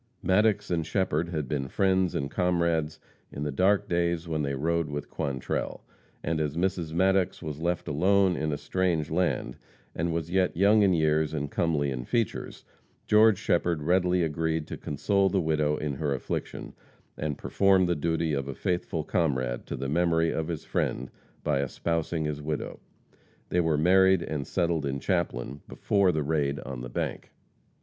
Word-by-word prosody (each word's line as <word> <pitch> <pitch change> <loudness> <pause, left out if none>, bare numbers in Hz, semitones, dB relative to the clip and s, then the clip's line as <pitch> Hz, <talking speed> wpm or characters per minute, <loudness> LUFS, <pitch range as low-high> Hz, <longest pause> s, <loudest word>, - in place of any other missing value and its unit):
Maddox 105 +2 +2
and 85 -2 +1
Shepherd 85 -1 0
had 75 -5 -3
been 70 0 -2
friends 95 +2 +1
and 70 0 -2
comrades 85 -3 0 0.3
in 70 - -5
the 75 - -2
dark 100 +7 +2
days 85 -2 0
when 80 -2 -1
they 70 -1 -1
rode 85 +3 0
with 75 0 -5
Quantrell, 70 -3 -3 0.4
and 80 -1 -1
as 75 +1 -2
Mrs. 90 -3 -1
Maddox 95 +2 +1
was 75 -1 -5
left 85 +1 -1
alone 95 +4 +3
in 75 -1 -1
a 75 - -1
strange 85 -3 -1
land, 90 +2 0 0.4
and 85 +1 -1
was 85 0 -3
yet 95 -2 +1
young 105 +3 +5
in 95 -3 +4
years 80 -1 +1
and 75 -1 -3
comely 75 -4 0
in 65 -2 -4
features, 115 - -2 0.4
George 110 -1 +5
Shepherd 85 -5 0
readily 90 +1 +2
agreed 80 0 -1
to - - -4
console 95 +7 +1
the 95 - +1
widow 75 -2 +1
in 75 -2 -2
her 70 -2 0
affliction 65 - -5 0.4
and 75 -2 -3
perform 95 -2 +3
the 85 - +1
duty 80 +1 0
of 70 -1 -2
a 70 - -5
faithful 85 -1 -2
comrade 65 -7 -1
to - - -4
the 70 - -4
memory 80 +2 +2
of 80 -1 -2
his 85 -3 -4
friend 65 0 -2 0.3
by 70 - +1
espousing 80 +3 -2
his 75 -1 -3
widow. 75 0 -4 0.7
They 90 - +1
were 80 -3 +2
married 95 +2 +4
and 75 -4 -4
settled 85 -4 0
in 70 0 -2
Chaplin 75 -6 -2
before 100 -3 +2
the 80 -2 -1
raid 70 -2 0
on 65 -2 -6
the 60 - -6
bank. - - -4
80 Hz, 175 wpm, -27 LUFS, 75-90 Hz, 0.7 s, young